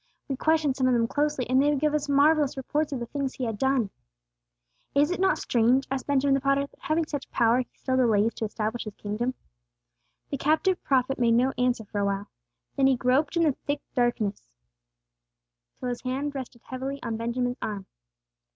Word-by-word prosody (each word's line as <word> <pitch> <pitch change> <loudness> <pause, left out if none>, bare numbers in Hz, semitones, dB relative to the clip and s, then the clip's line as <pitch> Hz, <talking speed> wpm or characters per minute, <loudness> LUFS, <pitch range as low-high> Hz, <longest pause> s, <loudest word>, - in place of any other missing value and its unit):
"We 270 - -2
questioned 310 -1 +2
some 260 -1 +1
of 255 - +3
them 230 -1 +2
closely, 290 -2 0
and 260 +2 +4
they 295 +1 +3
gave 300 +2 +1
us 295 -1 -1
marvellous 285 0 +3
reports 295 +3 -1
of 270 - -2
the 235 - -4
things 275 +2 -3
He 260 - -4
had 225 -4 -3
done." 265 -6 +1 1.0
"Is 290 +4 +4
it 365 - -2
not 380 0 +3
strange," 245 +3 +2
asked 270 -1 -3
Benjamin 280 -1 +3
the 275 - +2
potter, 275 +1 +2
"that - - -21
having 315 +1 0
such 285 -3 -5
power 235 +1 +3
He 250 - -3
still 260 -1 -1
delays 225 -3 +3
to 225 - -3
establish 220 +2 -3
His 210 -1 -7
kingdom?" 235 +5 -3 1.0
The 280 - -2
captive 315 +6 +1
prophet 265 0 +1
made 230 -1 +4
no 255 +3 +2
answer 250 -1 +1
for 205 - -4
awhile. 200 0 -1 0.5
Then 270 -1 +4
he 265 - +4
groped 260 +7 +1
in 335 - +4
the 310 - +4 0.2
thick 285 0 -1
darkness 240 - -1 1.3
till 250 - -3
his 245 - -4
hand 270 +3 -2
rested 255 -3 -7
heavily 265 +2 -5
on 230 -2 -2
Benjamin's 245 +2 -2
arm. 205 -3 -4
260 Hz, 195 wpm, -27 LUFS, 235-285 Hz, 1.3 s, and